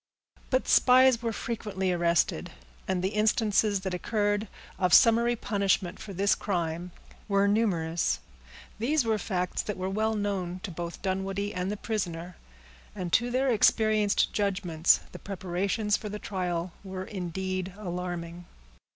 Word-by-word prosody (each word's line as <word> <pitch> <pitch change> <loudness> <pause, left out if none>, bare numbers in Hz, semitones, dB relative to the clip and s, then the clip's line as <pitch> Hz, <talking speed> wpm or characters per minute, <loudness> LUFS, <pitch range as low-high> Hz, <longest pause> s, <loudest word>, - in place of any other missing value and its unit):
But 260 0 +1
spies 255 -1 +6
were 230 -1 -1
frequently 205 -4 -3
arrested; 170 -1 +1 0.4
and 185 -1 -1
the 190 - +2
instances 210 -1 +2
that 190 -1 -3
occurred 205 +2 0 0.3
of 180 -2 +5
summary 235 0 +5
punishment 200 -4 0
for 205 - -8
this 195 +2 +2
crime 175 -2 -2 0.4
were 200 -1 +3
numerous. 175 -6 +1 0.6
These 270 +4 +1
were 220 -1 +1
facts 180 -3 -2
that 210 - -5
were 185 +1 -3
well 220 +2 0
known 190 -4 -2
to 200 - -4
both 170 +2 -6
Dunwoodie 195 +2 -2
and 180 +2 -2
the 210 - -3
prisoner; 180 -6 -4 0.6
and 180 -4 -5
to 240 +2 +3
their 260 +2 +1
experienced 215 -2 +3
judgments 185 -5 +2
the - - -9
preparations 195 +2 -1
for 210 - -7
the 210 - -5
trial 180 -4 -3
were 190 -1 -6
indeed 185 0 -4
alarming. 175 -3 -5
195 Hz, 140 wpm, -28 LUFS, 180-215 Hz, 0.6 s, spies